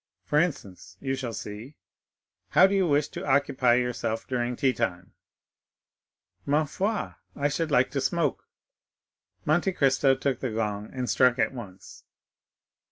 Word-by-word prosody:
For 150 - +2
instance, 140 - -3
you 135 -1 -2
shall 130 -3 -3
see; 105 +6 -8 0.7
how - - +6
do 195 - +2
you 190 -2 +2
wish 145 -1 +2
to - - -7
occupy 130 -3 +3
yourself 120 -2 -1
during 125 -1 -2
tea 130 0 +2
time?" 90 -7 -3 1.3
"Ma 150 +2 +2
foi, 200 +8 -2 0.2
I 145 - +1
should 160 +3 -2
like 130 -3 +3
to 140 - -1
smoke." 150 +1 -1 1.0
Monte 175 +5 +2
Cristo 135 -2 +3
took 130 -1 -1
the 130 - -2
gong 105 -1 -3
and 130 -1 -3
struck 125 -1 +3
it - - +1
once. 100 -7 -11
130 Hz, 145 wpm, -27 LUFS, 120-145 Hz, 1.3 s, how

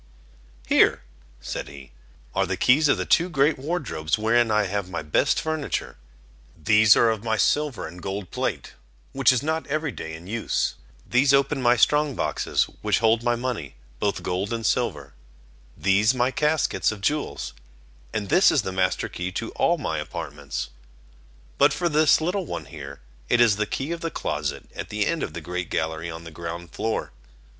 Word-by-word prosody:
"Here," - - +4 0.4
said - - -5
he, 70 -2 -12 0.4
"are - - +1
the - - -2
keys 150 +5 +4
of 145 - +3
the - - -2
two 175 +2 +3
great 145 -2 +2
wardrobes, 135 - -2
wherein 115 +2 +2
I 105 0 +3
have 100 -1 -3
my 85 -3 -4
best 75 - +2
furniture; 160 -2 -3 0.6
these 105 +6 +5
are 115 - +4
of 110 -1 -4
my 110 -1 0
silver 145 +1 +1
and 90 +2 -11
gold 95 +1 -5
plate, - - -3 0.4
which 135 0 +4
is 130 -1 0
not 160 +1 -1
every 150 0 -1
day 80 -7 -7
in 80 +2 -11
use; 110 +4 -1 0.3
these 135 +3 +4
open 140 0 +1
my 120 0 +4
strong 150 +2 +3
boxes, - - 0 0.2
which - - +2
hold 115 0 +3
my 120 0 +1
money, 120 - -4 0.2
both 100 - -1
gold 95 +4 -2
and 115 -1 -3
silver; - - -1 0.6
these 105 +6 +3
my 125 +1 +1
caskets 150 -3 +1
of 105 -2 -8
jewels; 150 +8 -2 0.6
and 105 -2 -3
this 175 +5 +6
is 140 - +2
the 95 - -3
master 95 0 0
key 90 +1 -5
to 115 +3 -4
all 175 - +2
my 80 - -2
apartments. 75 -3 -5 0.9
But - - +5
for 175 - 0
this 155 -2 +4
little 180 +2 -1
one - - -5
here, 70 -3 -9 0.3
it 120 - +3
is 115 -4 +5
the 105 0 0
key 135 +9 -3
of 170 -1 -4
the 165 - -2
closet 70 - -3
at - - -6
the - - 0
end - - -1
of - - -3
the - - -6
great 90 -1 -4
gallery 80 +2 -2
on 80 0 -7
the 85 - -10
ground 85 +1 -7
floor. 110 0 -2
110 Hz, 185 wpm, -24 LUFS, 90-140 Hz, 0.9 s, this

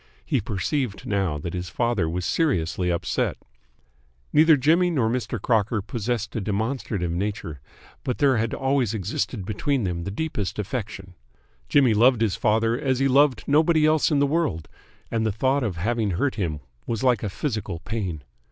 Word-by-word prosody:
He 135 -7 0
perceived 110 +1 -2
now 95 -7 0
that 85 +3 -5
his 90 -1 -4
father 115 -6 0
was 90 +2 -3
seriously 90 - 0
upset. 85 - -1 1.0
Neither 155 0 +6
Jimmy 165 +7 +3
nor 125 -9 +1
Mr. 125 -1 -2
Crocker 110 +1 +1
possessed 110 +1 -3
a 115 - -1
demonstrative 105 -3 -2
nature, 85 -6 -3 0.4
but 125 - -2
there 135 -4 +3
had 110 0 -1
always 130 -5 0
existed 95 -1 -3
between 125 +6 -1
them 85 -3 -2
the 95 - -4
deepest 105 -3 -3
affection. 100 -3 -5 0.6
Jimmy 135 -6 +4
loved 120 +2 +4
his 110 -4 +1
father 115 +2 +2
as 130 -3 0
he 135 +1 +2
loved 135 -2 +3
nobody 155 +2 +4
else 155 0 +3
in 150 - +2
the 140 - +4
world, 140 - -1 0.4
and 115 -1 0
the 110 - +1
thought 130 +7 +1
of 105 -8 -2
having 110 +4 0
hurt 140 +6 +1
him 80 -8 -3 0.3
was 115 +1 -2
like 125 -5 +3
a 105 - -2
physical 110 - -3
pain. 95 -9 -4
115 Hz, 170 wpm, -24 LUFS, 95-135 Hz, 1.0 s, Neither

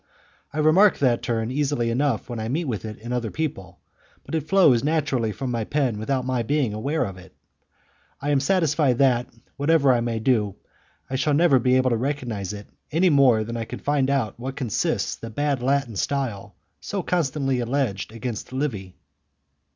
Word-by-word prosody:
I - - -8
remark 165 +7 +5
that 125 -4 +2
turn 115 0 -2
easily 135 -4 0
enough 130 -2 0
when 120 -3 -5
I 110 - -3
meet 160 +7 -1
with 115 -6 -3
it 105 -1 -6
in 120 +3 -6
other 120 -2 -1
people, 140 -12 -5 0.5
but - - -10
it 155 -2 -1
flows 155 -12 +5
naturally 140 -7 0
from 130 +4 -4
my 115 -2 -1
pen 130 -4 -1
without 130 +3 -1
my 130 -2 0
being 135 -2 0
aware 140 +9 -1
of 95 -2 -7
it. 90 - -16 0.8
I 145 +1 -1
am 140 - +3
satisfied 150 -4 +2
that, 125 -3 +3 0.3
whatever 140 -2 +4
I 120 - +1
may 115 -1 -2
do, 110 -4 +1 0.5
I 130 - -2
shall 145 +2 +1
never 155 -4 +5
be 125 +1 +2
able 130 0 +3
to 115 - +2
recognize 120 -7 -3
it 105 0 -8 0.3
any 175 +3 +3
more 130 -6 +5
than 115 +2 -6
I 115 -1 -3
can - - -7
find 140 -2 0
out 135 -7 0
in - - -10
what 135 +1 -4
consists 125 -7 -1
the 115 - -8
bad 140 +2 -1
Latin 135 -3 0
style 105 -4 -2 0.2
so 200 -3 -4
constantly 140 -7 0
alleged 120 -5 -1
against 115 0 -5
Livy. 110 -10 -3
130 Hz, 190 wpm, -24 LUFS, 115-145 Hz, 0.8 s, remark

